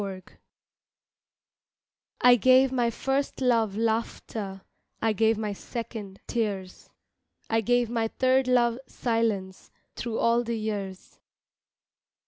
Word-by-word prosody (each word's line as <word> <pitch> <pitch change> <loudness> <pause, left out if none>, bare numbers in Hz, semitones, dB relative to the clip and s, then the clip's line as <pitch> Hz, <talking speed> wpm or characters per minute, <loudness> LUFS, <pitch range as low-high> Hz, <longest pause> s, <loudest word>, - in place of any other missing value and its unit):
GIFTS 190 -2 -7 1.9
I 245 0 +8
GAVE 255 +2 +5
my 245 -2 +1
first 270 +4 -2
love 230 -6 +2
laughter, 220 -3 -2 0.4
I 225 -1 +1
gave 220 +1 +2
my 210 -1 -2
second 210 -2 -7
tears, 200 -5 -3 0.6
I 225 0 +3
gave 245 +1 +2
my 230 -1 0
third 260 +2 +2
love 240 -1 +3
silence 220 -6 -2 0.3
Thru 230 -2 -3
all 235 +1 +3
the 235 -1 -2
years. 200 -4 -5
225 Hz, 110 wpm, -27 LUFS, 210-245 Hz, 1.9 s, I